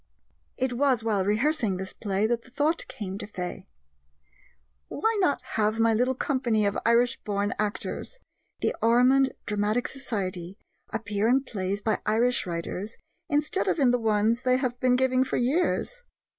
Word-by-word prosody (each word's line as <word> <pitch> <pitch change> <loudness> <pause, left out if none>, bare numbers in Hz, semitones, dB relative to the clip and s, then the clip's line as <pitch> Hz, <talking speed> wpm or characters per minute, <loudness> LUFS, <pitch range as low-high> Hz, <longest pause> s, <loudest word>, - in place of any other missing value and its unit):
It 260 -1 0
was 255 -2 +2
while 210 -4 +1
rehearsing 220 0 +1
this 190 0 -6
play 200 -1 -1
that 235 +1 0
the 255 - -17
thought 295 +5 0
came 205 -7 -6
to - - -6
Fay: 180 -4 -6 1.2
"Why 445 +9 0
not 325 -6 +1
have 215 +1 +1
my 225 0 +4
little 250 +4 +1
company 240 -6 +1
of 200 - 0
Irish 235 +1 +3
born 205 0 -1
actors 210 - -3 0.4
the - - 0
Ormond 255 +4 +4
Dramatic 210 +3 0
Society 195 -8 -4 0.3
appear 210 -1 -1
in 260 +3 +3
plays 200 -4 -3
by 220 - 0
Irish 235 +1 +2
writers 180 +5 -4 0.3
instead 300 +6 0
of - - +1
in 265 -5 +4
the 245 - +2
ones 220 +1 +2
they 255 0 +3
have 250 -2 -2
been 250 0 +3
giving 255 0 +3
for 265 - -2
years?" 350 - 0
230 Hz, 155 wpm, -27 LUFS, 205-260 Hz, 1.2 s, my